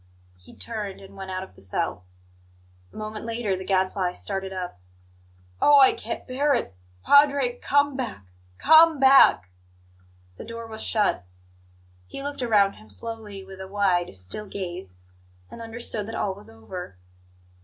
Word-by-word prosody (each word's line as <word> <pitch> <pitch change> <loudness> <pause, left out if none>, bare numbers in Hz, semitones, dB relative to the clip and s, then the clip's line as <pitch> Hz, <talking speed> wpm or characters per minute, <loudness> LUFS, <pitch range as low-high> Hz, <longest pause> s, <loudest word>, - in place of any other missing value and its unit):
He 90 - -17
turned, 210 -4 -5
and 195 0 -14
went 195 -1 -8
out 185 0 -3
of 190 - -13
the - - -19
cell. 90 -1 -3 0.9
A - - -21
moment 215 0 -6
later 225 -3 -2
the 185 - -6
Gadfly 185 -1 0
started 195 0 -4
up. 180 - -6 0.8
"Oh, 290 -1 +7
I 265 - +7
can't - - -6
bear 280 +2 +2
it! 100 - -3 0.3
Padre, 280 -4 +4
come 285 0 +2
back! 235 - -5 0.3
Come 320 - +6
back!" 265 - +6 0.9
The - - -8
door 230 0 -7
was 220 -1 -8
shut. 210 - +1 0.8
He 275 - -8
looked 285 -1 -5
around 205 -5 +3
him 110 0 -17
slowly, 210 - -6
with 190 0 -11
a 190 - -7
wide, 190 - 0
still 90 - -9
gaze, 175 - -6 0.5
and 235 - -9
understood 225 -2 -5
that 225 - -6
all 195 - -1
was 200 +2 -7
over. 110 - -9
205 Hz, 155 wpm, -25 LUFS, 185-240 Hz, 0.9 s, Oh